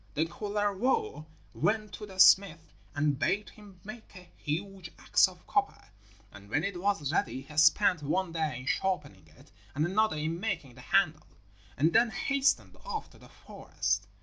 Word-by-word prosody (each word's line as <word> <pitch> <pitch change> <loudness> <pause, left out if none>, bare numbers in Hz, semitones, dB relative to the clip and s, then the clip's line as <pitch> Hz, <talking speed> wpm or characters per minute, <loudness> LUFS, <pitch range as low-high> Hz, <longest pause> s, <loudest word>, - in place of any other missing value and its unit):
Then 160 +2 0
Kullervo 205 - -1 0.3
went 215 -1 -1
to 210 - -8
the 190 -1 -11
smith 175 -4 +5 0.2
and 145 -1 0
bade 205 +6 0
him 205 -4 -16
make 215 +1 -11
a 180 -1 -14
huge 185 +3 -5
axe - - +4
of - - -15
copper, - - -1 0.4
and 100 0 -14
when 145 +8 0
it 180 -2 -3
was 190 -8 0
ready 130 -5 -1
he 150 +2 -13
spent 170 +2 +4
one 175 +5 -1
day 155 -6 -2
in - - -11
sharpening 145 - -2
it 75 - -20 0.2
and 150 +2 +1
another 215 +2 +1
in 160 +3 -2
making 180 - -3
the 125 - -14
handle, 155 -2 +1 0.5
and 160 +5 +2
then 230 +1 +5
hastened 280 +6 0
off 445 -3 -5
to - - -18
the - - -16
forest. - - -3
180 Hz, 170 wpm, -30 LUFS, 150-205 Hz, 0.5 s, smith